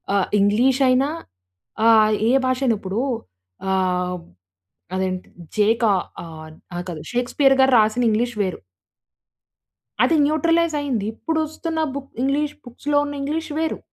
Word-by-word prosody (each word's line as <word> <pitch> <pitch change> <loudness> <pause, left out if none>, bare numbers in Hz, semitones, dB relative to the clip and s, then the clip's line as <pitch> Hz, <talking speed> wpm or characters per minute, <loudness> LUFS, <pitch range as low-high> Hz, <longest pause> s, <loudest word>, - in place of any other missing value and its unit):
ఆహ్, 195 - +2
ఇంగ్లీషయినా 255 +6 +3 0.8
ఆహ్, 215 -1 +6 0.2
ఏ - - +4 0.2
భాషయిన. 255 -2 +1
ఇప్పుడూ 195 +3 -3 0.7
ఆహ్, 180 -1 0 0.8
అదేం‌టి 185 -1 -3 0.3
జే‌కా 220 +1 +3 0.3
ఆన్ 155 -1 -11 0.2
అహ! 175 - -3
కాదు. 160 -3 -6
షేక్‌స్పియర్ 265 +3 +2
గారు 265 - +4
రాసిన 215 +3 +2
ఇంగ్లీష్ 235 +3 0
వేరు. 190 -2 -2 1.4
అది 330 - +3
న్యూట్రలైజయింది. 305 -6 +1
ఇప్పుడొస్తున్న 320 +3 -3 0.2
బుక్ 280 -1 -7
ఇంగ్లీష్ 290 +2 0
బుక్స్‌లో 290 +4 -1
ఉన్న 290 - -5
ఇంగ్లీష్ 310 +3 -3
వేరు. 320 0 -1
245 Hz, 110 wpm, -22 LUFS, 205-290 Hz, 1.4 s, ఆహ్